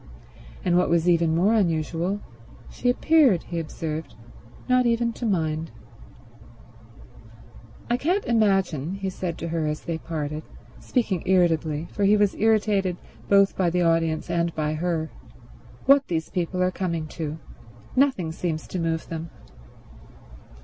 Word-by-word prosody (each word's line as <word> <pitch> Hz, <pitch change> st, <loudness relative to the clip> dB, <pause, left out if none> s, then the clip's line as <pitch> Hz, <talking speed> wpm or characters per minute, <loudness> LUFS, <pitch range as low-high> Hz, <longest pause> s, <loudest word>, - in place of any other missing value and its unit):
And, 175 Hz, 0 st, +4 dB
what -, -, +1 dB
was 170 Hz, 0 st, +2 dB
even 165 Hz, -2 st, +3 dB
more 190 Hz, +6 st, +3 dB
unusual, 175 Hz, 0 st, 0 dB, 0.5 s
she 245 Hz, -, -1 dB
appeared, 260 Hz, -, +4 dB
he 170 Hz, -, -4 dB
observed, 160 Hz, -2 st, -5 dB, 0.5 s
not 255 Hz, -1 st, +3 dB
even 235 Hz, 0 st, +1 dB
to 235 Hz, -, -3 dB
mind. 160 Hz, -4 st, -1 dB, 2.2 s
"I 240 Hz, -, +1 dB
can't 360 Hz, +10 st, 0 dB
imagine," 195 Hz, -, +1 dB
he 195 Hz, -1 st, -3 dB
said 180 Hz, -3 st, -4 dB
to 165 Hz, -, -5 dB
her 160 Hz, -2 st, -1 dB
as 150 Hz, 0 st, -3 dB
they 165 Hz, -1 st, -4 dB
parted, 155 Hz, -2 st, -4 dB, 0.4 s
speaking 215 Hz, -, -1 dB
irritably, 165 Hz, -4 st, +2 dB
for 205 Hz, -, -2 dB
he 210 Hz, +2 st, +5 dB
was 205 Hz, -1 st, +3 dB
irritated 205 Hz, -4 st, +1 dB, 0.3 s
both 200 Hz, -1 st, +5 dB
by 185 Hz, -2 st, +2 dB
the 180 Hz, +1 st, +1 dB
audience 165 Hz, -1 st, +1 dB
and 170 Hz, 0 st, 0 dB
by 155 Hz, -1 st, -1 dB
her, 160 Hz, 0 st, -2 dB, 0.7 s
"what 275 Hz, 0 st, +5 dB
these 160 Hz, -2 st, -2 dB
people 180 Hz, +1 st, -1 dB
are 180 Hz, -, +2 dB
coming 170 Hz, -4 st, -2 dB
to. 155 Hz, -1 st, -5 dB, 0.6 s
Nothing 255 Hz, -, +2 dB
seems 160 Hz, -1 st, -3 dB
to 185 Hz, -, -3 dB
move 165 Hz, -1 st, -2 dB
them." 165 Hz, 0 st, -5 dB
175 Hz, 140 wpm, -25 LUFS, 160-200 Hz, 2.2 s, he